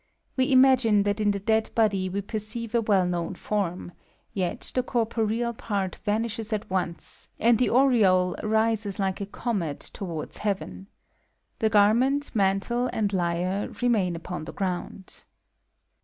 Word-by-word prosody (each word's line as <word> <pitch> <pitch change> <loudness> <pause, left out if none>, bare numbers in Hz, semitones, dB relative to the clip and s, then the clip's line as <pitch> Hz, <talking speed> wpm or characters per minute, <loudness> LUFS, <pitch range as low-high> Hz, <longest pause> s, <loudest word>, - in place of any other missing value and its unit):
We 260 +1 +1
imagine 255 -6 +5
that 205 +1 -1
in 210 -1 +2
the 200 -1 0
dead 220 +2 +1
body 200 -4 +2
we 200 +2 -2
perceive 215 +2 -5
a 235 - +3
well 200 -4 +3
known 175 0 -2
form; 180 -3 -3 0.4
yet 185 -3 -3
the 255 - +2
corporeal 230 -1 -1
part 200 -5 -3
vanishes 225 +1 -2
at 215 -1 -2
once, 180 -2 -3
^md 230 0 +4
the 250 - +3
aureole 215 -9 +4
rises 220 -2 0
like 195 0 -1
a 200 - -3
eomet 195 - -2 0.2
towards 170 -6 -6
heaven. 95 - -3 0.7
The 220 - +2
^etrmenty 235 +8 +3
mamHe, 215 +4 +1
mid 205 -2 0
lyre 180 +2 -1
remain 215 -8 +1
upon 165 -1 -6
the - - -8
ffround. 190 0 -5
205 Hz, 140 wpm, -26 LUFS, 185-230 Hz, 0.7 s, imagine